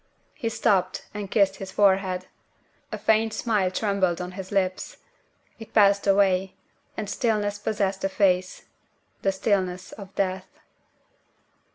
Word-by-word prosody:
She 230 Hz, -, -3 dB
stooped 195 Hz, -5 st, +1 dB
and 205 Hz, -2 st, -5 dB
kissed 195 Hz, -2 st, +2 dB
his 195 Hz, -, -7 dB
forehead. 190 Hz, -2 st, +2 dB, 0.7 s
A 215 Hz, -, -3 dB
faint 220 Hz, +1 st, +2 dB
smile 210 Hz, -6 st, +1 dB
trembled 190 Hz, -3 st, 0 dB
on 180 Hz, 0 st, -5 dB
his 190 Hz, 0 st, -8 dB
lips. 185 Hz, -2 st, -1 dB, 0.6 s
It 225 Hz, -, -12 dB
passed 200 Hz, -2 st, +4 dB
away; 195 Hz, -1 st, +3 dB, 0.4 s
and 215 Hz, -, -3 dB
stillness 205 Hz, -1 st, 0 dB
possessed 200 Hz, -2 st, -1 dB
the 195 Hz, -, 0 dB
face 185 Hz, -2 st, +1 dB, 0.6 s
the 195 Hz, -, +2 dB
stillness 190 Hz, -2 st, -1 dB
of 195 Hz, -2 st, -11 dB
Death. 190 Hz, +8 st, -2 dB
195 Hz, 130 wpm, -25 LUFS, 185-210 Hz, 0.7 s, passed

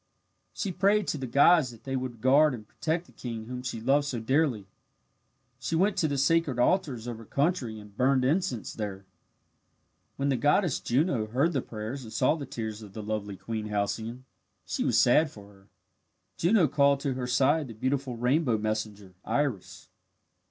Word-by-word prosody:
She 200 Hz, -, -3 dB
prayed 200 Hz, +3 st, +2 dB
to 150 Hz, -, -2 dB
the 130 Hz, -, -4 dB
gods 140 Hz, +3 st, +5 dB
that 115 Hz, -2 st, -13 dB
they 135 Hz, 0 st, -3 dB
would 125 Hz, -3 st, -4 dB
guard 140 Hz, +3 st, +5 dB
and 110 Hz, -3 st, -12 dB
protect 165 Hz, +7 st, -2 dB
the -, -, -20 dB
king 115 Hz, -3 st, -6 dB
whom 125 Hz, +1 st, -6 dB
she 125 Hz, -2 st, -4 dB
loved 140 Hz, +5 st, +2 dB
so 125 Hz, -4 st, -2 dB
dearly. 130 Hz, -3 st, +1 dB, 0.9 s
She 165 Hz, -, -2 dB
went 195 Hz, +5 st, +2 dB
to 160 Hz, -, +2 dB
the 145 Hz, -2 st, -2 dB
sacred 145 Hz, -1 st, +2 dB
altars 125 Hz, -3 st, +1 dB
of 120 Hz, -2 st, -5 dB
her 115 Hz, -, -11 dB
country, 140 Hz, -, -1 dB
and 105 Hz, -1 st, -14 dB
burned 130 Hz, +2 st, +2 dB
incense 135 Hz, -, -1 dB
there. 100 Hz, -3 st, -5 dB, 1.1 s
When 140 Hz, +1 st, -1 dB
the 135 Hz, -, +1 dB
goddess 145 Hz, -, +2 dB
Juno 125 Hz, -3 st, 0 dB
heard 135 Hz, +10 st, +1 dB
the 135 Hz, -, 0 dB
prayers 115 Hz, +5 st, -6 dB
and 110 Hz, -, -10 dB
saw 115 Hz, -, +2 dB
the 150 Hz, -4 st, -6 dB
tears 110 Hz, -3 st, -5 dB
of 105 Hz, -3 st, -11 dB
the 110 Hz, -, -6 dB
lovely 105 Hz, -2 st, -4 dB
Queen 110 Hz, +3 st, -4 dB
Halcyone, 110 Hz, +4 st, -3 dB, 0.4 s
she -, -, -2 dB
was -, -, +3 dB
sad 150 Hz, +6 st, +4 dB
for 100 Hz, -4 st, -14 dB
her. 95 Hz, 0 st, -22 dB, 0.7 s
Juno 175 Hz, -1 st, +3 dB
called 140 Hz, 0 st, +3 dB
to 140 Hz, -2 st, -1 dB
her 125 Hz, -1 st, -4 dB
side 135 Hz, +4 st, +2 dB
the 115 Hz, -, -9 dB
beautiful 130 Hz, +1 st, -2 dB
rainbow 125 Hz, 0 st, +2 dB
messenger, 105 Hz, -3 st, -4 dB
Iris. 120 Hz, -4 st, -2 dB
125 Hz, 180 wpm, -28 LUFS, 110-145 Hz, 1.1 s, gods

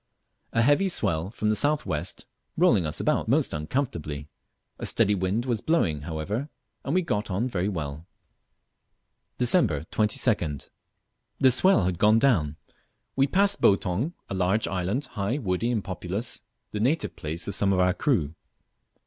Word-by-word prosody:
A 115 Hz, -, +2 dB
heavy 145 Hz, +9 st, +3 dB
swell 90 Hz, -, 0 dB
from 110 Hz, -1 st, -2 dB
the 110 Hz, -, +3 dB
south 150 Hz, +5 st, +2 dB
west 80 Hz, +4 st, -4 dB, 0.3 s
rolling 115 Hz, -, +4 dB
us 75 Hz, -, -3 dB
about -, -, 0 dB
most -, -, +1 dB
uncomfortably. 75 Hz, -, -3 dB, 0.5 s
A -, -, -3 dB
steady 105 Hz, -, +2 dB
wind 100 Hz, +5 st, -1 dB
was 120 Hz, -5 st, -1 dB
blowing 85 Hz, -, +1 dB
however, 100 Hz, -, -3 dB, 0.3 s
and 140 Hz, -, -2 dB
we 185 Hz, -, +3 dB
got 105 Hz, -10 st, -2 dB
on 100 Hz, +7 st, -1 dB
very 100 Hz, -5 st, -1 dB
well. 80 Hz, -3 st, -5 dB, 1.3 s
Dec. 120 Hz, -, +2 dB
22d. 105 Hz, -, 0 dB, 0.7 s
The 130 Hz, -, +5 dB
swell 130 Hz, -, +4 dB
had 90 Hz, -2 st, -1 dB
gone 105 Hz, +1 st, +5 dB
down. 95 Hz, -, +2 dB, 0.6 s
We 135 Hz, +1 st, +3 dB
passed 200 Hz, +5 st, +2 dB
Boutong, 100 Hz, -, +2 dB
a -, -, -5 dB
large 95 Hz, +3 st, +1 dB
island, 95 Hz, +9 st, -2 dB
high, 100 Hz, +6 st, -2 dB
woody, 110 Hz, -2 st, -1 dB
and 115 Hz, -5 st, -1 dB
populous, 95 Hz, +6 st, -4 dB, 0.3 s
the 105 Hz, -, -3 dB
native 135 Hz, +9 st, 0 dB
place 80 Hz, +3 st, -4 dB
of 100 Hz, -, -2 dB
some 100 Hz, 0 st, +2 dB
of 95 Hz, -, +2 dB
our 90 Hz, 0 st, +3 dB
crew. 100 Hz, -, 0 dB
105 Hz, 155 wpm, -26 LUFS, 90-125 Hz, 1.3 s, The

